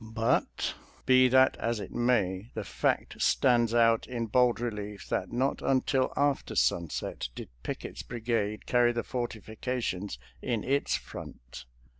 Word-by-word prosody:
But 115 +1 0 0.3
be 130 0 +6
that 130 +1 +5
as 115 -1 -1
it - - -7
may, 110 -4 +1
the 110 - -3
fact - - -1
stands 120 -3 +3
out 115 -1 +3
in 120 -2 -3
bold 120 +1 +3
relief 105 -4 -5
that - - -1
not 130 +3 0
until 130 0 +1
after 145 -1 +1
sunset 85 -6 0
did - - -7
Pick - - -5
ett's - - -6
brigade 115 -3 -2
carry 120 -1 +3
the 115 - -2
fortiflcations 110 - -3 0.2
in 115 -4 -1
its 140 +2 +1
front. - - -9
115 Hz, 140 wpm, -29 LUFS, 105-125 Hz, 0.3 s, be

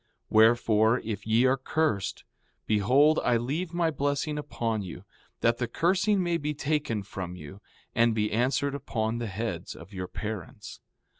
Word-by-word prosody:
4:6 - - -55
Wherefore, 110 +1 +4
if 105 -2 -5
ye 115 +3 +4
are 130 +1 +3
cursed, 130 -9 -1 0.4
behold, 130 +9 +4
I 120 -1 +3
leave 150 +9 -2
my 170 -2 +1
blessing 145 +1 -1
upon 115 -6 -2
you, 90 -1 -8 0.4
that 115 0 +2
the 120 - 0
cursing 190 - +2
may 175 -1 +1
be 150 -1 -3
taken 145 -8 -1
from 95 -2 -6
you 90 +4 -11 0.3
and 115 -1 +3
be 105 -1 0
answered 130 +5 +1
upon 115 -4 -2
the 120 - -3
heads 100 -4 -4
of 90 +6 -13
your 90 -1 -4
parents. 105 +3 -7
115 Hz, 160 wpm, -28 LUFS, 105-145 Hz, 0.4 s, Wherefore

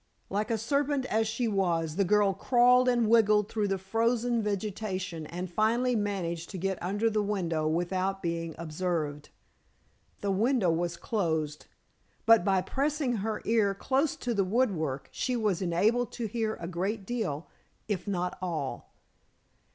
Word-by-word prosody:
Like 205 +2 -1
a 230 - +1
serpent, 280 +4 0
as 220 -2 +1
she 230 +2 -1
was, 170 -6 0
the 200 - +2
girl 205 +1 +3
crawled 250 +4 +4
and 235 -3 +2
wriggled 210 -2 +4
through 215 -2 0
the 195 -1 0
frozen 230 +4 +1
vegetation 195 -5 -3
and 180 +3 -5
finally 230 +7 +1
managed 185 -6 -2
to 195 - -6
get 190 +1 -2
under 205 +5 0
the 215 -1 +1
window 175 -7 -1
without 185 +4 0
being 165 -1 -2
observed. 160 -3 -3 0.9
The 200 - 0
window 215 -2 +2
was 170 +1 -1
closed, 160 -9 -2 0.6
but 225 -4 +6
by 190 -1 +2
pressing 275 +2 0
her 215 +2 -3
ear 210 -3 +2
close 270 +8 +1
to 245 - -2
the 200 -3 +2
woodwork 185 - 0
she 255 - -1
was 210 -6 0
enabled 210 +7 +1
to 235 - -3
hear 220 0 -1
a 170 - -7
great 190 +4 -2
deal, 185 -10 -3 0.4
if 205 -2 -2
not 180 -3 -2
all. 160 -7 -4
200 Hz, 150 wpm, -29 LUFS, 175-225 Hz, 0.9 s, but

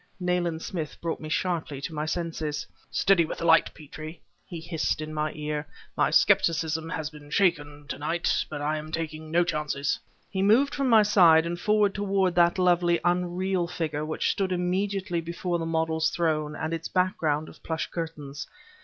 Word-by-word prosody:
Nayland 175 -2 -1
Smith 165 -6 -5
brought 165 -1 -3
me 155 - -7
sharply 165 -4 -1
to 160 - -5
my 150 0 -3
senses. 160 -3 -3 0.2
"Steady 195 -3 +3
with 160 - -5
the 170 - -4
light, 165 0 +5
Petrie!" 155 +2 -9 0.3
he 170 -3 -6
hissed 165 -1 -1
in 155 0 -5
my 155 0 -1
ear. 150 0 -4 0.3
"My - - +2
skepticism 160 -1 +3
has 160 -3 -3
been 150 -1 -13
shaken, 145 -5 +1
to - - -5
night, 165 +4 0
but 145 -1 -5
I 155 +1 0
am 155 +1 -9
taking 155 -1 -4
no 170 +2 +3
chances." 150 -4 -1 0.3
He 190 - -3
moved 230 +8 +4
from 275 -2 0
my 220 -2 +7
side 170 -6 +6
and 175 +1 -3
forward 210 -1 +2
toward 195 -3 +1
that 175 0 +4
lovely, 175 -1 +3
unreal 180 +1 0
figure 160 -4 -3
which 155 +1 0
stood 190 -2 -1
immediately 185 0 -1
before 170 +1 -3
the 165 - -3
model's 160 -1 +1
throne 155 -3 -1
and 160 +2 -3
its 165 0 -3
background 160 -5 0
of - - -14
plush 160 -1 -2
curtains. 150 -4 -5
165 Hz, 180 wpm, -27 LUFS, 155-180 Hz, 0.3 s, my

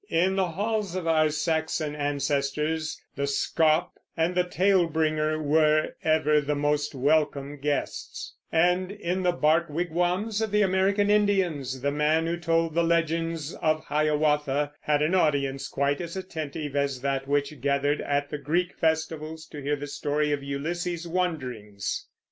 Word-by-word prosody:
In 185 +3 +2
the 190 -1 +2
halls 205 +1 -2
of 185 -2 -3
our 155 -1 +3
Saxon 155 0 -1
ancestors 145 +2 -1 0.2
the 140 0 -1
scop 155 +3 +2 0.3
and 165 +2 +1
the 180 0 +2
tale 180 0 +2
bringer 155 -1 0
were 155 0 +2
ever 155 -1 +3
the 150 +1 -1
most 145 0 0
welcome 145 0 +1
guests; 145 +1 -3 0.2
and 180 +3 +2
in 185 -2 -2
the 180 -1 +3
bark 165 0 +2
wigwams 180 +7 -1
of 220 - 0
the 210 +1 +3
American 195 +2 +2
Indians 180 -11 +1
the 140 +1 0
man 150 +2 +2
who 170 +1 -1
told 165 -1 +1
the 170 - +2
legends 165 -1 0
of 155 -1 0
Hiawatha 150 -1 +1
had 150 0 +1
an 155 +4 +1
audience 140 -6 +1
quite 140 +2 0
as 170 +2 -6
attentive 155 -5 -5
as 140 -3 0
that 135 0 -1
which 145 -1 -1
gathered 140 +2 +1
at 145 0 -1
the 150 - -3
Greek 170 +6 0
festivals 160 0 -1
to 145 - -8
hear 145 +2 0
the 145 0 -6
story 145 +1 -1
of 145 -1 0
Ulysses's 170 +5 -3
wanderings. 130 - -3
155 Hz, 155 wpm, -26 LUFS, 145-170 Hz, 0.3 s, our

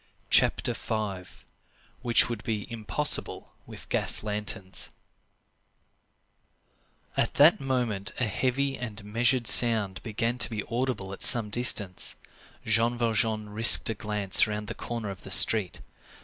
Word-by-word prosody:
CHAPTER - - +2
V—WHICH 110 +3 -4
WOULD 115 -3 -7
BE 110 -3 -4
IMPOSSIBLE 105 -7 -2
WITH - - -11
GAS - - +2
LANTERNS 105 -2 -4 2.3
At - - -2
that 150 +5 +5
moment 120 -7 -3
a - - -1
heavy 135 +5 -2
and 110 -4 -7
measured 120 +3 0
sound 110 -6 +4
began 115 +2 -4
to 110 - +2
be 110 -3 -5
audible 115 -6 -4
at - - -11
some 110 -3 +3
distance. 100 -6 +1 0.5
Jean 115 +2 0
Valjean 110 -2 -2
risked 115 +1 +7
a - - -3
glance 105 -2 0
round 105 0 -6
the 115 - -6
corner 115 -4 -6
of 95 - -11
the - - -12
street. 105 -5 +3
110 Hz, 125 wpm, -26 LUFS, 105-120 Hz, 2.3 s, risked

